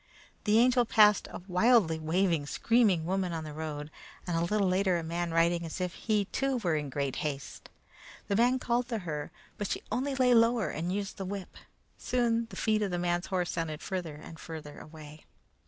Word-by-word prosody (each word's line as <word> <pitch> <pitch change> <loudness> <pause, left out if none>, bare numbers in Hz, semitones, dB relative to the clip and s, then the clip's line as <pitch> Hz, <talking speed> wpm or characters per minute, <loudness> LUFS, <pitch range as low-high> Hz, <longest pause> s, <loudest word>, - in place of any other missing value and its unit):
The 210 0 +4
Angel 245 +1 +5
passed 210 -2 +5
a - - -8
wildly 185 -3 +3
waving, 165 -1 +1
screaming 210 -5 +2
woman 185 0 -1
on 160 -1 -3
the 155 -1 -7
road, 150 -1 -5 0.3
and 175 - -2
a 165 - +1
little 200 +3 +1
later 185 -1 +2
a 170 - -3
man 170 +1 -2
riding 170 +1 +2
as 165 +2 -6
if 180 -1 -2
he, 210 -3 0
too, 270 +6 -1
were 180 -9 0
in 150 -2 -2
great 140 -1 -2
haste. 140 -2 -5 0.6
The 200 - 0
man 245 +4 +4
called 240 -1 0
to 230 - -1
her, 150 -3 -4 0.3
but 205 - -1
she - - -3
only 270 +2 -1
lay 255 -2 +4
lower 230 -2 +4
and 170 +3 -3
used 200 0 -3
the 195 - -4
whip. 195 0 -6 0.4
Soon 235 -2 0
the - - -10
feet 215 -1 +1
of 205 - 0
the 175 - -2
man's 175 0 -1
horse 180 -2 -1
sounded 160 -1 -4
farther 175 -5 -4
and 155 +1 -11
farther 150 0 -8
away. 155 -1 -12
180 Hz, 200 wpm, -30 LUFS, 160-220 Hz, 0.6 s, Angel